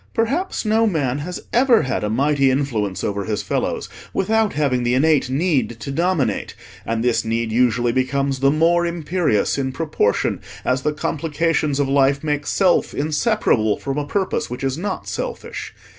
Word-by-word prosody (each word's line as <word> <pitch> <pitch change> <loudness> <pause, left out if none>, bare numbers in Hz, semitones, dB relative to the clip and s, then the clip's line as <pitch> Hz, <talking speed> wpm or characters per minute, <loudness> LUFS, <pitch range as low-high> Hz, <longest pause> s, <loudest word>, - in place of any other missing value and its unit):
Perhaps 275 +9 -1
no 220 +1 +3
man 145 - 0
has 175 +5 -6
ever 240 - +4
had 130 -5 -2
a 105 - -1
mighty 140 +4 +2
influence 120 -8 -1
over 100 -1 -2
his 105 -2 -2
fellows - - -2 0.3
without 220 +2 +1
having 140 -4 +1
the 120 +1 +1
innate 145 -1 +3
need 135 -5 0
to 140 - -5
dominate, 170 -1 0 0.3
and 115 0 -1
this 120 -1 +2
need 115 0 -1
usually 120 0 +2
becomes 135 +2 0
the 135 +1 +4
more 165 +4 +3
imperious 170 - 0
in 130 -1 -1
proportion 145 -8 0 0.2
as 125 +1 +1
the 150 - 0
complications 155 -1 -1
of 140 - +2
life 140 +1 +2
make 150 -2 -1
Self 185 -3 +2
inseparable 150 - +1
from 140 +1 -3
a 145 - -4
purpose 195 +2 -1
which 125 +2 -6
is 135 -1 0
not 190 +6 -4
selfish. - - -5
140 Hz, 165 wpm, -21 LUFS, 125-170 Hz, 0.3 s, ever